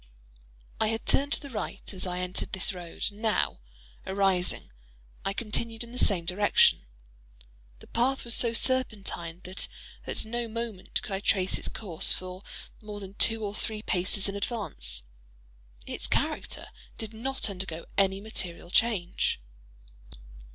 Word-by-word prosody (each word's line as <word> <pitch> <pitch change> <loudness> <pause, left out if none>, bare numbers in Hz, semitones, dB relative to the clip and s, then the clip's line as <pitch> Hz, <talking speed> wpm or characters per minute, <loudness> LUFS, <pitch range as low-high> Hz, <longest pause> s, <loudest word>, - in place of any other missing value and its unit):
I 220 - +3
had 225 +1 -1
turned 285 +1 +3
to - - +2
the 280 -2 -9
right 210 -2 -3
as 190 0 -1
I 180 0 -1
entered 180 0 -2
this 190 +1 +1
road, 175 -2 -5
and 205 +1 -14
now, 220 - +2 0.5
arising, 190 - +2 0.5
I 195 - +1
continued 225 +2 -1
in 235 - -10
the 250 - -3
same 180 -5 +4
direction. 185 - +5 0.9
The - - -11
path 255 +3 +1
was 235 - +6
so 235 0 +4
serpentine, 210 -9 +1
that 185 +1 -4 0.4
at - - -3
no 235 +1 -2
moment 225 -4 -3
could - - -7
I 190 - 0
trace 190 -2 +2
its - - -3
course 185 -5 0
for 185 0 -2 0.4
more 210 -1 -6
than 195 -1 -8
two 225 +1 +4
or 200 - -2
three 215 0 -3
paces 190 0 +1
in 200 - -3
advance. 70 - -2 0.8
Its - - -2
character - - 0 0.3
did 220 -1 -4
not 265 +5 -1
undergo 185 -4 -4
any 195 -1 +4
material 180 -5 -3
change. 200 - +3
200 Hz, 150 wpm, -29 LUFS, 185-225 Hz, 0.9 s, was